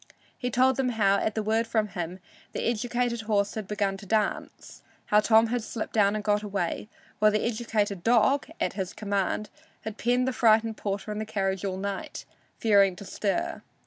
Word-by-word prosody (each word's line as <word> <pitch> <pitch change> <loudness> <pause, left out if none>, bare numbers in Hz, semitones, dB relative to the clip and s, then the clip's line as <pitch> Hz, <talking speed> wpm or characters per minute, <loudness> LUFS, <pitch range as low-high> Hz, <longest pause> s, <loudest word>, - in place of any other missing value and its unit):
He 245 - -3
told 255 +2 +3
them 265 -2 +1
how, 200 -2 +4
at 215 +1 -1
the 220 - -1
word 220 +2 +1
from 220 -2 0
him, 180 -2 -5 0.4
the - - -3
educated 240 +1 -1
horse 205 -2 0
had 215 -3 -5
begun 200 -2 -1
to 200 0 -12
dance; 215 +1 -2 0.2
how 210 - +4
Tom 220 +1 +5
had 245 0 0
slipped 220 0 -5
down 205 -1 +3
and 215 - -3
got 210 0 +2
away, 200 -1 -3 0.3
while 215 +1 +6
the 210 0 0
educated 215 -4 -1
dog, 245 +4 +3
at - - 0
his 190 -2 -4
command, 205 0 -2 0.3
had 220 0 -7
penned 245 +2 +2
the 260 - 0
frightened 225 -1 +3
porter 200 +1 -4
in 210 - -3
the - - -1
carriage 195 -3 -2
all 190 -2 -2
night, 200 0 -5 0.3
fearing 200 -4 +4
to 200 - -10
stir. 200 +1 -2
215 Hz, 190 wpm, -27 LUFS, 200-225 Hz, 0.4 s, while